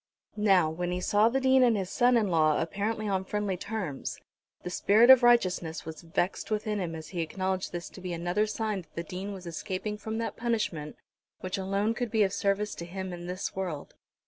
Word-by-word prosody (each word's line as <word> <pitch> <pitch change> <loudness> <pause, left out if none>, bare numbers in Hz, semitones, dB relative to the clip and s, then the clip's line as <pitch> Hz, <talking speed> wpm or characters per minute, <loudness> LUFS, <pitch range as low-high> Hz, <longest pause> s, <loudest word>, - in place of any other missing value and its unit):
Now, 195 -6 +4
when 175 +3 -3
he 180 - -1
saw 210 +4 +3
the 265 +3 +1
Dean 265 0 +4
and 235 -4 +4
his 190 -2 -3
son 245 -1 +4
in 215 -4 +1
law 155 -3 +3
apparently 210 +6 -2
on 190 -2 0
friendly 205 0 -2
terms, 185 -7 -4 0.5
the 180 - -5
spirit 220 +7 +6
of 260 -1 +9
righteousness 185 -9 +2
was 160 0 -7
vexed 175 +4 -2
within 215 -1 -1
him 170 -3 -3
as 160 -1 -8
he 175 -3 -3
acknowledged 185 +3 -2
this 175 -1 -5
to 190 - -11
be 180 -1 -4
another 175 +5 0
sign 215 -2 -2
that 170 - -23
the 170 - -3
Dean 185 +4 -6
was 190 -2 -8
escaping 190 +5 -4
from 220 +1 -4
that 230 - -3
punishment 215 -11 -2 0.5
which 185 +1 -3
alone 195 +3 0
could 240 +1 -3
be 220 -1 +3
of 195 -1 0
service 200 +1 0
to 170 - -7
him 185 +1 -5
in 175 0 -7
this 185 +2 -4
world. 175 -7 -4
195 Hz, 210 wpm, -29 LUFS, 175-215 Hz, 0.5 s, of